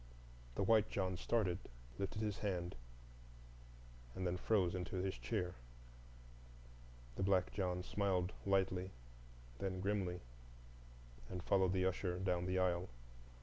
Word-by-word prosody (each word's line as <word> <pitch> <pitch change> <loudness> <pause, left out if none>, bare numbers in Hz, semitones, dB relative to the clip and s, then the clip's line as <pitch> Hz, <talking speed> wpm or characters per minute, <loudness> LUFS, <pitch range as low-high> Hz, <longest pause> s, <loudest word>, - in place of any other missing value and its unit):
The - - +1
White 110 +1 +5
John 95 -2 0
started, 95 -1 +1 0.4
lifted 100 +3 -1
his 105 -2 -1
hand, 90 -4 -1 1.4
and 95 - -2
then 90 0 +1
froze 90 -2 +2
into 90 0 -3
his 95 +1 0
chair; 90 -6 -2 1.6
the - - -1
black 95 -2 +3
John 90 -2 0
smiled 95 -2 +1
lightly, 95 -1 +2 0.7
then 95 -1 -1
grimly, 95 -2 0 1.1
and 90 -1 -4
followed 95 -1 +3
the 95 -1 +2
usher 90 -1 0
down 90 -1 +1
the 95 0 +1
aisle. 90 0 +2
95 Hz, 120 wpm, -39 LUFS, 90-100 Hz, 1.6 s, White